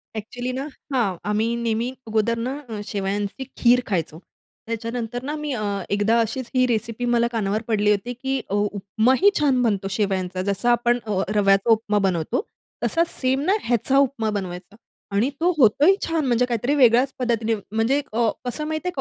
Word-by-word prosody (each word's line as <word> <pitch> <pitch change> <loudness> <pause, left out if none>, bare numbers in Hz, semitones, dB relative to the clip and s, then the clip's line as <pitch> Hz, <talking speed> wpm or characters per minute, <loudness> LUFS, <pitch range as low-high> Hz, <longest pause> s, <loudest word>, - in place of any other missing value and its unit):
Actually 245 +4 -4
ना 270 +3 -4 0.3
हां 250 -3 +3 0.2
आम्ही 220 +3 +1
नेहमी 230 +1 0 0.2
अगोदर 220 +1 +1
ना 250 +4 -3 0.3
शेवयांची 200 +4 -2
खीर 245 +1 +4
खायचो. 165 -5 -2 0.5
त्याच्यानंतर 230 +1 -4
ना 295 +3 -3
मी 300 -1 -4
अ, 215 -3 -3 0.3
एकदा 205 +3 +2
अशीच 230 +2 -2
ही 255 0 +4
रेसिपी 230 +1 -2
मला 235 0 +3
कानावर 215 -1 -1
पडली 210 -2 +2
होती 210 +4 -1
की 265 +2 -2
उ 200 - -1 0.2
उपमाही 220 - +3
छान 275 -4 +3
बनतो 205 -5 0
शेवयांचा. 190 -3 -1
जसा 200 +5 +1
आपण 240 +1 +2
अ, 205 -3 0
रव्याचा 195 +1 +3
उपमा 215 -1 +2
बनवतो 170 - -1 0.4
तसाच 335 0 +2
सेम 260 +1 +1
ना - - +5
ह्याचा 245 +3 +1
उपमा 235 -4 -3
बनवायचा 190 -1 -5 0.4
आणि 225 +7 +2
तो 355 - +4
होतोही 280 - +5
छान. 325 -3 0
म्हणजे 250 -1 +2
काहीतरी 245 +3 0
वेगळ्याच 255 0 +4
पद्धतीने 230 -2 0 0.2
म्हणजे 225 +6 +1
अ, 230 0 +2 0.2
कसं 275 +5 -3
माहिती 315 +3 -3
आहे 360 - -2
230 Hz, 165 wpm, -23 LUFS, 210-255 Hz, 0.5 s, ना